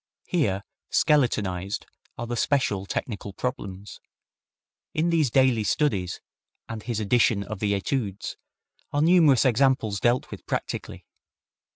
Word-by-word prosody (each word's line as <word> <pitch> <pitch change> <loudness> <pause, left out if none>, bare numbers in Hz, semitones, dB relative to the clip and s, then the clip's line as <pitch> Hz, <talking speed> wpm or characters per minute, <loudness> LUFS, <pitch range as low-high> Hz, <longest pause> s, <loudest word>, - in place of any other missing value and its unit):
Here 100 - 0 0.3
skeletonized 100 -9 +1 0.3
are 120 - -4
the 120 +1 -3
special 110 -7 +1
technical 100 -3 -4
problems. 100 -4 -5 1.0
In 165 +2 +2
these 160 -5 +3
Daily 130 -3 +3
Studies, 100 - 0 0.5
and 115 -1 -6
his 115 -1 -3
edition 110 -1 +2
of 100 0 -6
the 100 -1 +1
Etudes, 100 -1 -2 0.6
are 145 +1 +1
numerous 160 -7 +5
examples 120 -5 +2
dealt 120 +3 +1
with - - -8
practically. - - -4
115 Hz, 115 wpm, -26 LUFS, 100-135 Hz, 1.0 s, numerous